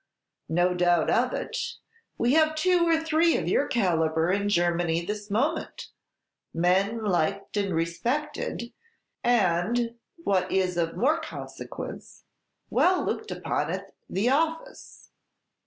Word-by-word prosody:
"No 175 Hz, +3 st, +2 dB
doubt 175 Hz, -2 st, +2 dB
of -, -, +2 dB
it; -, -, -4 dB, 0.4 s
we 240 Hz, +3 st, +2 dB
have 315 Hz, 0 st, +4 dB
two 350 Hz, +1 st, +3 dB
or 330 Hz, -1 st, +4 dB
three 320 Hz, +1 st, +2 dB
of -, -, -3 dB
your -, -, +2 dB
calibre 165 Hz, -5 st, +1 dB
in 205 Hz, 0 st, -1 dB
Germany 175 Hz, -2 st, +1 dB
this 210 Hz, +1 st, -5 dB
moment, 235 Hz, +10 st, -1 dB, 0.7 s
men 190 Hz, +6 st, +2 dB
liked 195 Hz, +1 st, -1 dB
and 200 Hz, -4 st, 0 dB
respected; 235 Hz, -, -2 dB, 0.5 s
and, 230 Hz, +1 st, +2 dB, 0.3 s
what 185 Hz, -, +1 dB
is 185 Hz, -2 st, +1 dB
of 165 Hz, -1 st, -1 dB
more 300 Hz, +7 st, +2 dB
consequence, 320 Hz, -, -8 dB, 0.5 s
well 365 Hz, 0 st, +3 dB
looked -, -, -3 dB
upon -, -, -2 dB
at -, -, -5 dB, 0.2 s
'the 195 Hz, +5 st, 0 dB
Office.'" 320 Hz, +5 st, -2 dB
200 Hz, 125 wpm, -26 LUFS, 175-275 Hz, 0.7 s, have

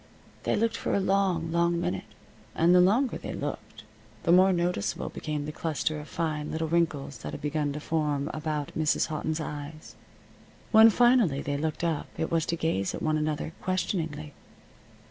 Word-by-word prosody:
They -, -, +2 dB
looked 230 Hz, +1 st, +1 dB
for -, -, -1 dB
a -, -, +2 dB
long, 190 Hz, -4 st, +1 dB
long 170 Hz, 0 st, +2 dB
minute, 95 Hz, -, -4 dB, 0.4 s
and 170 Hz, +2 st, +4 dB
the 180 Hz, -, +7 dB
longer 225 Hz, +8 st, +2 dB
they -, -, -6 dB
looked -, -, -6 dB, 0.4 s
the 170 Hz, -, +2 dB
more 185 Hz, +2 st, +6 dB
noticeable 175 Hz, -, -1 dB
became 150 Hz, -1 st, -4 dB
the 150 Hz, -, -4 dB
cluster 155 Hz, -1 st, -2 dB
of 150 Hz, -, -9 dB
fine 155 Hz, -3 st, -2 dB
little 160 Hz, 0 st, -2 dB
wrinkles 155 Hz, -4 st, 0 dB
that -, -, -7 dB
had -, -, -6 dB
begun 150 Hz, 0 st, -1 dB
to 150 Hz, -, -4 dB
form 150 Hz, -2 st, -1 dB
about 155 Hz, -2 st, -3 dB
Mrs. 155 Hz, +1 st, +1 dB
Houghton's 155 Hz, +1 st, -2 dB
eyes. 150 Hz, 0 st, -7 dB, 0.8 s
When 220 Hz, 0 st, +9 dB
finally 235 Hz, -, +3 dB
they 145 Hz, -, -2 dB
looked 155 Hz, +2 st, -3 dB
up 165 Hz, -3 st, -1 dB
it 160 Hz, -, -2 dB
was 165 Hz, -1 st, +1 dB
to 170 Hz, -, 0 dB
gaze 160 Hz, -, -1 dB
at -, -, -6 dB
one 155 Hz, -1 st, +1 dB
another 155 Hz, +1 st, -2 dB
questioningly. 160 Hz, -5 st, -2 dB
160 Hz, 175 wpm, -28 LUFS, 150-175 Hz, 0.8 s, When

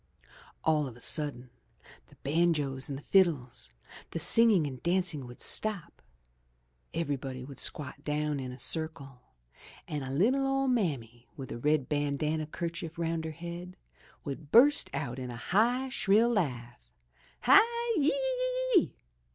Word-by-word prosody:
All 155 Hz, -3 st, +2 dB
of 120 Hz, -2 st, -10 dB
a -, -, -15 dB
sudden, 130 Hz, -3 st, -1 dB, 0.6 s
the -, -, -20 dB
banjos 145 Hz, -3 st, 0 dB
and 140 Hz, -, -4 dB
the 145 Hz, -, -12 dB
fiddles, 150 Hz, -, +1 dB, 0.4 s
the -, -, -5 dB
singing 225 Hz, -8 st, +6 dB
and 130 Hz, -3 st, -7 dB
dancing 170 Hz, -6 st, 0 dB
would 120 Hz, -, -12 dB
stop, 215 Hz, -6 st, +1 dB, 0.9 s
everybody 135 Hz, -5 st, -4 dB
would 135 Hz, -1 st, -10 dB
squat 140 Hz, -1 st, 0 dB
down 150 Hz, -1 st, -2 dB
in 130 Hz, -1 st, -6 dB
a 125 Hz, -, -10 dB
circle, 140 Hz, -2 st, -3 dB, 0.7 s
and 150 Hz, -2 st, -4 dB
a 130 Hz, -, -6 dB
little 240 Hz, -, +1 dB
old 270 Hz, -1 st, +1 dB
mammy 125 Hz, -, -2 dB
with 135 Hz, -3 st, -8 dB
a 120 Hz, -, -6 dB
red 150 Hz, 0 st, +1 dB
bandana 150 Hz, +1 st, -1 dB
kerchief 165 Hz, 0 st, -6 dB
round 165 Hz, -1 st, -2 dB
her -, -, -3 dB
head 170 Hz, +3 st, -8 dB, 0.5 s
would 140 Hz, +1 st, -7 dB
burst 285 Hz, +5 st, +5 dB
out 120 Hz, +2 st, -4 dB
in 125 Hz, -1 st, -6 dB
a 120 Hz, -, -7 dB
high, 235 Hz, -, +1 dB
shrill 225 Hz, -1 st, +3 dB
laugh, 125 Hz, -, -3 dB, 0.5 s
*'Hi, -, -, +7 dB, 0.4 s
yi, 285 Hz, -, +2 dB
yi, -, -, +1 dB
yi!' -, -, -8 dB
155 Hz, 145 wpm, -29 LUFS, 135-195 Hz, 0.9 s, Hi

